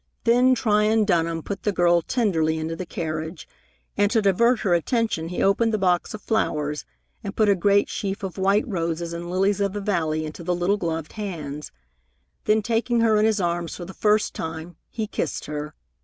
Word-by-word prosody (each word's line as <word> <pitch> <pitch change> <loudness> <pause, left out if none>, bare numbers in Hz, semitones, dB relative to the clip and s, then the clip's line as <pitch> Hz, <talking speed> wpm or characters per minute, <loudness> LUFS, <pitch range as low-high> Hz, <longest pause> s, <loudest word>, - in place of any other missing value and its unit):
Then 250 +2 +4
Tryon 215 -1 +2
Dunham 165 -4 0
put 200 -1 -5
the 210 - 0
girl 175 -2 +3
tenderly 160 -7 0
into 160 +1 -3
the 180 +1 -6
carriage, 160 0 -5 0.5
and 205 0 +3
to 225 - +2
divert 220 +4 +3
her 185 - +2
attention 175 -1 0
he 175 - -2
opened 225 +4 +3
the 215 - +1
box 180 +1 +1
of 210 - -11
flowers 150 -9 -1 0.4
and 200 -1 -5
put 215 - +3
a - - +6
great 200 +2 +3
sheaf 200 -1 -4
of 190 0 -5
white 200 +6 +2
roses 170 -4 -2
and 170 +1 -5
lilies 195 +2 +1
of 200 -1 0
the 205 - -3
valley 160 -6 -1
into 155 +2 -8
the 180 +1 0
little 180 +4 +1
gloved 165 -4 -3
hands. 155 -9 -6 0.7
Then, 215 0 +3
taking 235 +1 +1
her 225 -1 +4
in 210 - +3
his 220 -1 +2
arms 170 -2 -1
for 175 - -7
the 190 - -9
first 210 +1 +2
time, 160 +1 -6
he 220 - -3
kissed 170 - -3
her. 150 0 -5
190 Hz, 195 wpm, -24 LUFS, 165-210 Hz, 0.7 s, a